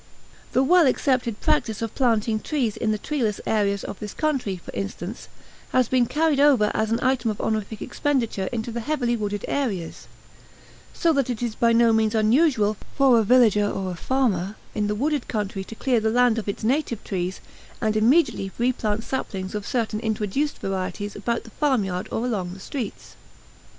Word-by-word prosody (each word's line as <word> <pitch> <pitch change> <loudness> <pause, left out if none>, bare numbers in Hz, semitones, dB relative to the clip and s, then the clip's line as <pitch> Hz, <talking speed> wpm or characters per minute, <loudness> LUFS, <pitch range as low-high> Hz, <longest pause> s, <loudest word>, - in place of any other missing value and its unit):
The 260 - +4
well 345 +2 +5
accepted 255 -4 0
practice 225 -8 +1
of 225 - -4
planting 225 -4 +1
trees 245 -5 -1
in 215 - 0
the 215 - 0
treeless 225 -3 -1
areas 200 -2 +1
of 195 - -7
this 210 -1 -7
country, 270 -11 -1
for 175 - -11
instance, 155 - -5 0.5
has 255 -2 +4
been 250 -1 +2
carried 300 0 +1
over 265 -8 +5
as 220 0 0
an 230 - +2
item 255 -3 +1
of 215 - -3
honorific 215 -1 -2
expenditure 235 -9 -1
into 235 -1 -3
the 235 - -3
heavily 245 -2 0
wooded 205 -2 -3
areas; 205 -12 -3 0.8
so 335 -2 +1
that 275 -3 +1
it 245 -1 -3
is 235 -2 -1
by 230 +1 +2
no 230 0 +5
means 220 0 +2
unusual 220 -2 +3 0.2
for 265 -4 +5
a - - +3
village 235 -2 +5
or 200 -2 -1
a - - -5
farmer 210 -4 0 0.2
in 210 -1 0
the 210 - -1
wooded 285 +3 -1
country 205 -3 -3
to 225 - -9
clear 250 0 +1
the 220 0 +1
land 240 0 +3
of 210 - -5
its 200 - -4
native 245 -2 0
trees 185 -1 -3 0.4
and 215 -1 0
immediately 220 - +3
replant 225 -3 0
saplings 190 -8 -4
of 210 -1 -4
certain 230 -4 -1
introduced 220 +6 -1
varieties 195 +2 -4
about 235 +3 -2
the 225 - -13
farmyard 205 -12 0
or 230 - -1
along 190 -7 -2
the - - -11
streets. 235 +1 -6
225 Hz, 180 wpm, -24 LUFS, 205-255 Hz, 0.8 s, well